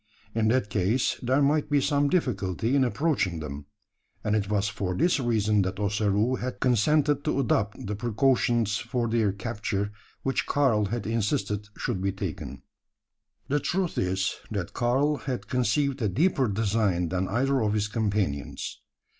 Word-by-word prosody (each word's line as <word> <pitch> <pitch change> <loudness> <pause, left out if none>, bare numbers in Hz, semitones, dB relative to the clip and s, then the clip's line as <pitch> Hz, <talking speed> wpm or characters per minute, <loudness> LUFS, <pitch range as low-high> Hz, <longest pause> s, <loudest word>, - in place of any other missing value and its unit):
In 110 -1 +1
that 110 -3 +1
case 105 +6 +1
there 130 +4 +2
might 145 +1 +2
be 145 -1 +3
some 140 +1 +2
difficulty 115 - 0
in 135 - +4
approaching 120 - 0
them; 70 -2 -7 0.6
and 105 - +1
it 100 -2 -1
was 105 -1 +1
for 100 -3 -3
this 170 +1 +2
reason 110 -4 +2
that 95 +1 -2
Ossaroo 105 +4 +1
had 125 +1 -4
consented 145 +4 +2
to 155 - 0
adopt 110 -5 0
the 105 +1 -3
precautions 120 -1 +1
for 120 -2 -2
their 110 -3 +2
capture 105 -1 -3 0.3
which 135 - 0
Karl 125 -8 +2
had 110 +1 -3
insisted 105 -2 -1
should 105 -7 -2
be 95 0 +1
taken. 95 -4 -6 0.8
The 145 +2 +1
truth 180 +3 -1
is, 95 +2 0
that 100 -5 -4
Karl 135 +5 +1
had 130 -3 -4
conceived 130 +2 +1
a 105 - +1
deeper 135 - +2
design 100 -4 +1
than 95 +1 -1
either 130 +6 +1
of 105 -1 +1
his 105 0 +1
companions. 105 -10 -2
110 Hz, 155 wpm, -27 LUFS, 100-130 Hz, 0.8 s, in